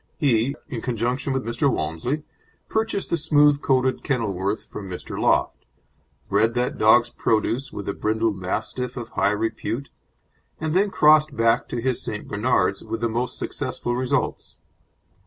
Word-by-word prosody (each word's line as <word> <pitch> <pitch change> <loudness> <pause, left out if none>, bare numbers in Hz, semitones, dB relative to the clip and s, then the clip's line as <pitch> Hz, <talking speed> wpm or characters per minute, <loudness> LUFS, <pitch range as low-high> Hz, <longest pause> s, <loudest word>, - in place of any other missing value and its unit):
He, 135 -3 +2
in 125 -7 -5
conjunction 125 +3 -1
with 135 -1 -1
Mr. 120 +5 +1
Walmsley, 80 - -2 0.5
purchased 220 -3 -1
the 170 - +2
smooth 145 -2 +4
coated 130 -1 +1
Kenilworth 105 -6 -1
from 100 -2 -8
Mr. 90 - -6
Loft, - - +1 0.6
bred 110 +4 +2
that 125 0 -1
dog's 120 +2 +5
produce 115 +4 0
with 100 - -7
a 100 - -1
brindle 110 +1 0
Mastiff 110 +7 -3
of 120 -1 -5
high - - +1
repute, 115 +5 -2 0.7
and 155 -1 -2
then 200 +3 +3
crossed 155 -3 +4
back 115 +1 +2
to 120 - -3
his 125 +1 0
St. 105 -2 -4
Bernards 100 -3 +1
with 110 +1 -5
the 115 - +1
most 120 +2 -2
successful 130 -3 -3
results. 125 0 -1
120 Hz, 150 wpm, -23 LUFS, 110-135 Hz, 0.7 s, dog's